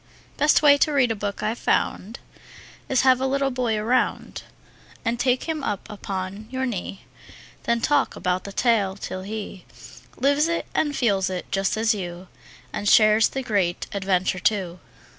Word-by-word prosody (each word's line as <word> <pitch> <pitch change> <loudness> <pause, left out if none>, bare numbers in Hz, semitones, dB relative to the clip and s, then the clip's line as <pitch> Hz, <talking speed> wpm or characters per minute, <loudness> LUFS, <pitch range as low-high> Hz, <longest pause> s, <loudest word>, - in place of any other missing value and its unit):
Best 300 +1 +3
way 285 -1 +7
to 305 - +3
read 265 -5 +3
a - - -1
book 205 -1 -4
I've 220 +3 -2
found 215 +6 -1 0.7
Is 265 - +3
have 260 -1 +4
a 265 - +1
little 275 0 0
boy 245 -3 -1
around 235 +4 -1 0.6
And 230 +1 -1
take 250 0 +1
him 315 -3 -3
up 205 -7 -3
upon 195 0 -5
your 260 +1 -2
knee; 195 -5 -5 0.6
Then 235 0 +1
talk 285 +2 +1
about 180 0 -1
the 200 - -7
tale, 205 -4 +1
till 185 -1 -6
he 200 -1 -7 0.5
Lives 285 +3 +2
it 335 0 -1
and 295 -2 0
feels 195 -6 +1
it, 185 -1 -6
just 195 +2 0
as 225 +1 +2
you, 180 -2 -7 0.4
And 205 - -1
shares 215 0 +6
the 270 - -4
great 195 -7 0
adventure, 190 -2 0
too. 185 -4 -1
220 Hz, 165 wpm, -24 LUFS, 195-260 Hz, 0.7 s, way